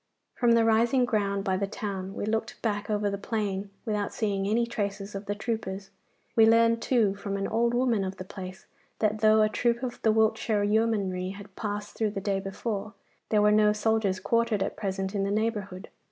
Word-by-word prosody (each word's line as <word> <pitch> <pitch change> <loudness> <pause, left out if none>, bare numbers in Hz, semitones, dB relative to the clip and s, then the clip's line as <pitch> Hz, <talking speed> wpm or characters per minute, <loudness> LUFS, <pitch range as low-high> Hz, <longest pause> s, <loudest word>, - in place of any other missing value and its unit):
From 240 -2 +3
the 230 -1 +4
rising 235 +3 +3
ground 200 -4 0
by 190 -2 0
the 200 +1 -1
town 195 -2 -5
we - - -3
looked 220 +1 -2
back 205 -2 -1
over 210 -1 0
the 200 -1 -2
plain 205 -2 -2 0.2
without 210 -2 -1
seeing 200 -3 -1
any 230 +3 +2
traces 205 -3 -4
of 200 +1 -6
the 205 - -1
troopers. 200 -3 -4 0.4
We 225 -1 +7
learned, 230 0 +4
too, 225 -7 +2
from 200 0 -4
an 195 - -1
old 235 +1 +1
woman 240 -5 +2
of 190 0 -4
the - - -6
place, 185 -1 -9 0.3
that 215 0 0
though 215 0 +5
a - - +4
troop 235 +3 0
of 245 -2 -4
the 220 - +4
Wiltshire 220 -1 +2
Yeomanry 200 -4 0
had 200 -1 -12
passed 205 -1 -4
through 220 -2 0
the 205 -1 -4
day 195 0 -1
before, 200 +2 -4 0.3
there 210 -1 +3
were 210 - +5
no 210 0 +5
soldiers 210 -3 +1
quartered 230 0 +1
at - - -4
present 190 -1 -3
in 200 -1 0
the 195 - -1
neighbourhood. 210 -2 -2
210 Hz, 200 wpm, -28 LUFS, 195-225 Hz, 0.4 s, We